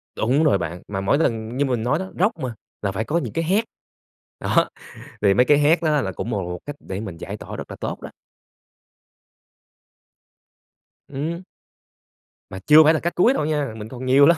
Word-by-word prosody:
Đủng 135 +8 +2
rồi 140 -10 +4
bạn, 85 0 -5
mà 95 -1 -3
mỗi 100 +9 +2
lần 115 -4 -1
như 145 - +2
mình 125 -4 -1
nói 145 +7 +1
đó, 190 0 -6
rock 200 0 +2
mà 130 -4 -3 0.3
là 100 - -1
phải 105 +3 -2
có 160 +7 0
những - - -3
cái 165 - 0
hét, 195 +7 +2 0.8
đó, - - +2 0.5
thì 100 -2 +5
mấy 125 - +5
cái 145 - +5
hét 155 +3 +3
nó 150 -2 +2
là 95 -7 -3
cũng 115 - -5
một 100 -4 -1
một 90 0 -5
cách 145 0 -6
để 95 +1 -5
mình 95 -6 -6
giải - - -6
tỏa - - -8
rất - - -8
là - - -7
tốt - - -4
đó. - - -8 3.0
Ừm. 160 +6 -4 1.1
Mà 95 - -7
chưa 155 +1 +8
phải 155 +1 +5
là 160 - +1
cách 175 - -2
cuối 235 +9 +4
đâu 150 - -1
nha, 150 -7 -1
mình 105 0 -7
còn 130 +1 -7
nhiều 135 +2 +6
lắm. 170 +2 +5
140 Hz, 210 wpm, -22 LUFS, 110-155 Hz, 3.0 s, chưa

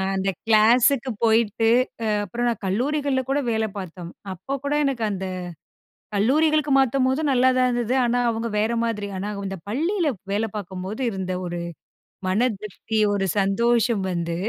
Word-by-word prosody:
அந்த 190 0 0 0.2
கிளாஸுக்கு 235 +4 +4
போயிட்டு 225 0 +3 0.4
அ - - 0 0.2
அப்புறம் 240 +5 -2
நான் 230 -3 -4
கல்லூரிகள்ல 275 +7 0
கூட 275 +2 +2
வேல 220 0 +1
பார்த்தோம். 180 -2 -7 0.2
அப்ப 270 +10 -4
கூட 285 +1 -1
எனக்கு 265 -4 -1
அந்த 190 -1 -4 0.9
கல்லூரிகளுக்கு 300 +7 +2
மாத்தம்போது 265 +1 +2
நல்லாதான் 255 0 +3
இருந்தது. 240 0 0
ஆனா, 245 0 +1
அவுங்க 230 0 -1
வேற 220 +2 +1
மாதிரி. 225 -3 -2
ஆனா, 195 +2 -3 0.2
இந்த 195 0 -4
பள்ளியில 330 - 0 0.2
வேலை 210 +2 +1
பார்க்கும்போது 190 +2 -6
இருந்த 190 -2 -4
ஒரு 175 0 -4 0.7
மன 185 +3 +1 0.2
திருப்தி, 215 +1 -4
ஒரு 195 -1 0
சந்தோஷம் 230 +2 +2
வந்து 170 -1 -2
225 Hz, 140 wpm, -23 LUFS, 195-255 Hz, 0.9 s, கிளாஸுக்கு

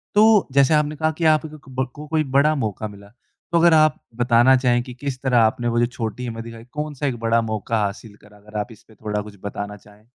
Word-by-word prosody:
तो 215 -1 +5
जैसे 140 +2 +4
आपने 150 0 +1
कहा 155 +1 0
कि 165 +2 -6
आ 155 -1 +6
कक 150 -3 -12
ब 130 0 -1
को 150 +1 -9
कोई 155 0 +1
बड़ा 150 +2 +4
मौका 110 -4 -3
मिला। 100 -1 -13 0.4
तो 170 - +3
अगर 170 -1 +5
आप 155 -1 +4 0.2
बताना 120 +2 +5
चाहें 120 -1 +2
कि 125 -1 -9
किस 130 0 -5
तरह 130 -3 +2
आपने 115 +1 +2
वो 120 - +2
जो 120 - +4
छोटी 115 +1 -4
हिम्मत 115 -1 -5
दिखाई, 115 0 -10
कौन-सा 150 +1 -5
एक 125 -3 -2
बड़ा 115 0 +2
मौका 110 +1 -2
हासिल 100 +1 -5
करा? 105 0 -18
अगर 105 +1 -10
आप 115 +3 -4
इस 110 - -15
पे 110 - -21
थोड़ा 105 0 -3
कुछ 105 0 -11
बताना 100 0 -5
चाहें। 105 +1 -20
120 Hz, 240 wpm, -22 LUFS, 110-150 Hz, 0.4 s, आ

